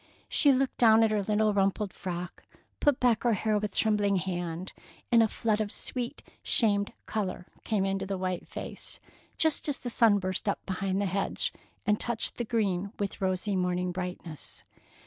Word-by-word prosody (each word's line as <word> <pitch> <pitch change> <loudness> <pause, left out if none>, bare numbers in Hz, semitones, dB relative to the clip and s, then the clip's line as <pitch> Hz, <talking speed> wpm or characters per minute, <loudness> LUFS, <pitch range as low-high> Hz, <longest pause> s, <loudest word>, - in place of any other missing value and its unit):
She 285 - +5
looked 265 0 +1
down 225 -1 +7
at 220 - +3
her 210 -1 +2
little 210 +1 +2
rumpled 195 0 +1
frock, 180 -1 -5 0.4
put 290 -3 +3
back 240 -3 +3
her 240 -2 +3
hair 210 +1 +1
with 210 -1 -4
trembling 210 -2 +2
hand, 175 -1 -3 0.4
and 230 -1 +7
a 225 - +5
flood 215 0 0
of 205 -1 -2
sweet, 250 +3 -4 0.2
shamed 205 -3 +2
color 195 -4 -3 0.2
came 205 -4 +1
into 195 0 -1
the 195 0 -2
white 185 -1 -3
face, - - -4 0.4
just 315 -1 +2
as 285 - +1
the 245 - -4
sun 225 -3 +5
burst 185 +1 -2
up - - -3
behind 190 0 -1
the 200 - +1
hedge 195 +1 -1 0.3
and 210 0 +2
touched 235 -2 -1
the 240 - -2
green 200 -4 0
with 200 0 -3
rosy 190 +2 0
morning 180 0 0
brightness. 180 -3 -5
205 Hz, 175 wpm, -29 LUFS, 185-220 Hz, 0.4 s, down